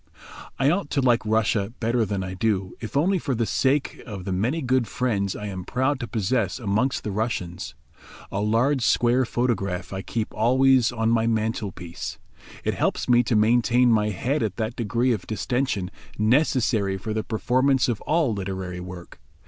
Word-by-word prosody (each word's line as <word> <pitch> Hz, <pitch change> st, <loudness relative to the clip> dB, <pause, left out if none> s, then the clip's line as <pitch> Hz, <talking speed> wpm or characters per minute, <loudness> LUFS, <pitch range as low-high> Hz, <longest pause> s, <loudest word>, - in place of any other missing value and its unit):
I 135 Hz, +2 st, +3 dB
OUGHT 195 Hz, +4 st, -1 dB
to 140 Hz, -, +1 dB
like 120 Hz, -2 st, +3 dB
Russia 110 Hz, -1 st, +1 dB
better 115 Hz, -1 st, +1 dB
than 100 Hz, -1 st, -2 dB
I 90 Hz, 0 st, -5 dB
do, 95 Hz, -1 st, -1 dB
if 115 Hz, +4 st, -4 dB
only 185 Hz, +6 st, +2 dB
for 135 Hz, -5 st, -2 dB
the 115 Hz, 0 st, 0 dB
sake 135 Hz, +8 st, 0 dB
of 100 Hz, -5 st, -7 dB
the 95 Hz, -, -3 dB
many 120 Hz, -, 0 dB
good 130 Hz, -2 st, +1 dB
friends 105 Hz, -7 st, -1 dB
I 105 Hz, -, -6 dB
am 95 Hz, -3 st, -5 dB
proud 130 Hz, +7 st, 0 dB
to 120 Hz, -, -4 dB
possess 110 Hz, -3 st, 0 dB
amongst 120 Hz, +3 st, 0 dB
the 105 Hz, -, -3 dB
Russians. 95 Hz, -5 st, -3 dB, 0.6 s
A 100 Hz, -, -2 dB
large 120 Hz, +6 st, +2 dB
square 120 Hz, +2 st, +3 dB
photograph 100 Hz, -7 st, -1 dB
I 95 Hz, -, -3 dB
keep 110 Hz, +3 st, -3 dB
always 130 Hz, +1 st, +4 dB
on 115 Hz, -1 st, 0 dB
my 115 Hz, -1 st, +2 dB
mantel 110 Hz, -2 st, -1 dB
piece; 85 Hz, -1 st, -7 dB, 0.5 s
it -, -, 0 dB
helps -, -, -1 dB
me 120 Hz, -1 st, +5 dB
to 120 Hz, -, 0 dB
maintain 120 Hz, +3 st, +4 dB
my 105 Hz, -1 st, +3 dB
head 130 Hz, -, -1 dB
at 105 Hz, -4 st, -1 dB
that 110 Hz, +1 st, -3 dB
degree 120 Hz, +2 st, 0 dB
of 110 Hz, -6 st, -2 dB
distention 110 Hz, -1 st, -1 dB, 0.3 s
necessary 110 Hz, -4 st, +2 dB
for 110 Hz, +3 st, -4 dB
the 110 Hz, 0 st, -1 dB
performance 130 Hz, +3 st, +2 dB
of 120 Hz, -4 st, -2 dB
all 155 Hz, -7 st, +1 dB
literary 95 Hz, -2 st, -4 dB
work. 90 Hz, -1 st, -9 dB
115 Hz, 180 wpm, -24 LUFS, 100-125 Hz, 0.6 s, me